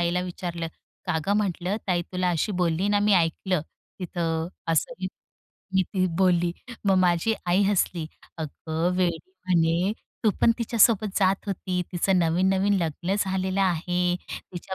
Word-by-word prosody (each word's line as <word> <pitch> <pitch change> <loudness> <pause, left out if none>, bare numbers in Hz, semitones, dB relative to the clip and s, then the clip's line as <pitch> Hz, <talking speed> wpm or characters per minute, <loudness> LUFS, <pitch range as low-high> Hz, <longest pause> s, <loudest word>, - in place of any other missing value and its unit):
आईला 175 +1 +1
विचारलं, 175 -2 -4 0.4
"का 175 - +1
ग 200 - +2
म्हटलं 195 -1 -1
ताई 175 -2 +1
तुला 180 0 +1
अशी 175 +5 0
बोलली 175 +3 +1
ना 205 0 +3
मी 210 - +4
ऐकलं, 175 +1 +1 0.4
तिथं." 165 -2 -2 0.2
असं 165 +10 +1 0.8
मी 190 - +5
ती 185 0 0
बोलली. 175 -2 +3 0.3
मग 195 -1 +4
माझी 180 +4 +2
आई 180 +3 +3
हसली. 185 -5 +1 0.3
"अगं 160 +2 -2
वेडी 175 -3 +1 0.3
म्हणे, 175 +2 +2 0.3
तू 215 - +6
पण - - +6
तिच्यासोबत 225 -3 +3
जात 195 0 +2
होती. 185 -2 -2
तिचं 185 +2 +2
नवीन-नवीन 190 +4 +2
लग्न 170 +4 -2
झालेलं 190 -1 0
आहे. 180 -1 +1
तिच्या 180 +1 -8
180 Hz, 140 wpm, -26 LUFS, 170-195 Hz, 0.8 s, तू